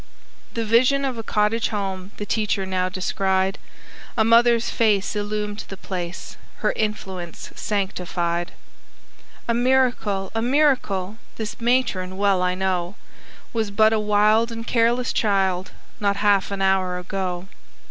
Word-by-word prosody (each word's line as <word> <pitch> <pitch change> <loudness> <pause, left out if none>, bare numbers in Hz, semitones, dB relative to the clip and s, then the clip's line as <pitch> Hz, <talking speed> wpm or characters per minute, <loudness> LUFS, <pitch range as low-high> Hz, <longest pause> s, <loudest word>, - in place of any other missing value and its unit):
The 230 -1 -1
vision 255 +5 +3
of 255 -4 -3
a - - -2
cottage 215 +1 +1
home 195 -3 -4
The 205 - -4
teacher 205 -2 0
now 185 -1 -1
descried; 190 +1 0 0.6
A 220 - +5
mother's 235 0 +4
face 210 -3 +1
illumed 210 0 -3
the 195 - -8
place 180 -2 -6 0.3
Her - - +4
influence 190 -5 -4
sanctified. 175 -4 -2 0.9
"A 235 - +2
miracle! 240 -6 +1
a 225 - -1
miracle! 240 -7 +1 0.2
This 220 +1 -6
matron, 230 -7 +1
well 200 -2 +2
I 180 0 +1
know, 185 -1 -1 0.6
Was 220 -3 0
but 215 +2 +4
a 220 - +2
wild 210 +2 +3
and 230 0 -6
careless 240 +2 +2
child, 190 -3 +1 0.3
Not 200 -1 +1
half 205 -1 +3
an 200 -1 -2
hour 190 -1 +2
ago. 180 0 -4
205 Hz, 135 wpm, -23 LUFS, 190-225 Hz, 0.9 s, A